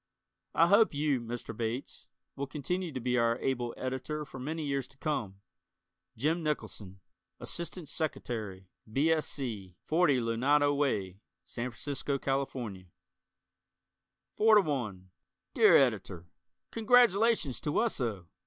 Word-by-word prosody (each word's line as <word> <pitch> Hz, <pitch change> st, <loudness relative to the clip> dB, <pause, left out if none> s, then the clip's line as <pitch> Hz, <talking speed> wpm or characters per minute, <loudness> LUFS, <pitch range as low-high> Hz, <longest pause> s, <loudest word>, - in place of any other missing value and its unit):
I 165 Hz, -, +6 dB
hope 200 Hz, -1 st, +5 dB
you, 145 Hz, -3 st, +1 dB
Mr. 120 Hz, 0 st, -6 dB
Bates, 115 Hz, +4 st, -4 dB, 0.3 s
will 140 Hz, 0 st, -3 dB
continue 170 Hz, +5 st, -3 dB
to 130 Hz, -, -4 dB
be 125 Hz, 0 st, +1 dB
our 115 Hz, 0 st, +2 dB
able 120 Hz, -3 st, -1 dB
Editor 130 Hz, +4 st, -3 dB
for 135 Hz, -1 st, -10 dB
many 155 Hz, +4 st, -3 dB
years 140 Hz, -2 st, -1 dB
to 135 Hz, -, -17 dB
come. 110 Hz, -11 st, -3 dB, 0.8 s
Jim 155 Hz, +8 st, +1 dB
Nicholson, 105 Hz, -, -4 dB, 0.4 s
Ass't 170 Hz, 0 st, -4 dB
Sec'y., 110 Hz, -, -4 dB, 0.3 s
B. 145 Hz, +7 st, +2 dB
S. 160 Hz, -1 st, +1 dB
C., 105 Hz, -10 st, -4 dB
40 155 Hz, -5 st, +3 dB
Lunado 140 Hz, +6 st, +2 dB
Way, 100 Hz, -10 st, -1 dB, 0.3 s
San 120 Hz, +2 st, -4 dB
Francisco, 140 Hz, +3 st, -3 dB
Calif. 135 Hz, 0 st, -1 dB, 1.9 s
Four 220 Hz, 0 st, +6 dB
to 210 Hz, -, +8 dB
One 105 Hz, -, -4 dB, 0.4 s
Dear -, -, +7 dB
Editor: 100 Hz, -9 st, 0 dB, 0.5 s
Congratulations 225 Hz, -, +3 dB
to 150 Hz, -, -2 dB
Wesso! 120 Hz, -, -1 dB
135 Hz, 125 wpm, -31 LUFS, 115-155 Hz, 1.9 s, to